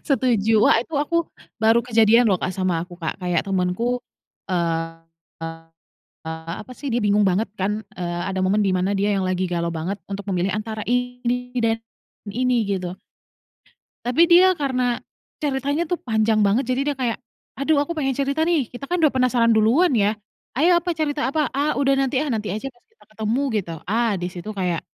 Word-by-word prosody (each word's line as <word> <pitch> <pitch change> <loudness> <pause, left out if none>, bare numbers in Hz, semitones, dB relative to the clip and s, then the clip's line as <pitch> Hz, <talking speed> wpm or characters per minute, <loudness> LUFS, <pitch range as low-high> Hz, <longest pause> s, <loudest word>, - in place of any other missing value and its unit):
Setuju, 225 -5 +3
wah - - +6
itu 315 +7 -8
aku 295 +4 0 0.4
baru 225 +1 +5
kejadian 230 0 +5
loh 190 - +3
Kak, 185 - -2
sama 185 -3 0
aku 180 - -12
Kak, 160 - -3
kayak 175 -2 +1
temenku 195 +6 0 0.5
eee 165 -2 -1 0.4
eee 165 0 -5 0.7
eee, 160 +1 -5
apa 255 - -12
sih 285 - -8
dia 240 - +1
bingung 205 +1 +3
banget 200 +5 +1
kan, 210 +3 -1
eee, 175 -1 -3
ada 190 -1 -2
momen 205 +3 +2
di 195 - +2
mana 185 +2 0
dia 205 +1 +1
yang 195 -1 0
lagi 185 0 0
galau 170 -1 -1
banget 180 +5 -3
untuk 200 0 -4
memilih 180 +2 0
antara 215 0 -4
ini 245 0 -1
dan 225 -1 +1 0.5
ini 245 +2 +1
gitu 185 -3 -2 1.2
Tapi 250 +7 +2
dia 370 +2 +7
karena, 255 -5 0 0.5
ceritanya 285 +3 0
tuh 355 - -1
panjang 220 -1 +2
banget 205 +7 +3
jadi 255 +1 0
dia - - -4
kayak, 240 -3 0 0.4
"Aduh 290 +1 +2
aku 315 - -6
pengen 270 -4 -1
cerita 280 +3 0
nih." 320 -8 +2
Kita 275 +3 -8
kan 355 0 0
udah 310 -3 +4
penasaran 250 -2 +3
duluan 245 +12 +4
ya. 210 0 +2 0.4
"Ayo 345 +5 +4
apa 350 +1 -2
cerita 300 -2 -1
apa?". 300 0 +1
"Ah 290 +2 +1
udah 275 -1 +3
nanti 265 -1 +1
ah, 305 - -4
nanti 215 -2 -2
aja 215 +7 -4
pas 240 - -31
kita 450 - -24
ketemu 220 +4 -1 0.2
gitu." 175 -5 -3 0.2
Ah 230 +2 +1
disitu 180 +3 -5
kayak, 180 -3 -1
225 Hz, 185 wpm, -22 LUFS, 190-265 Hz, 1.2 s, dia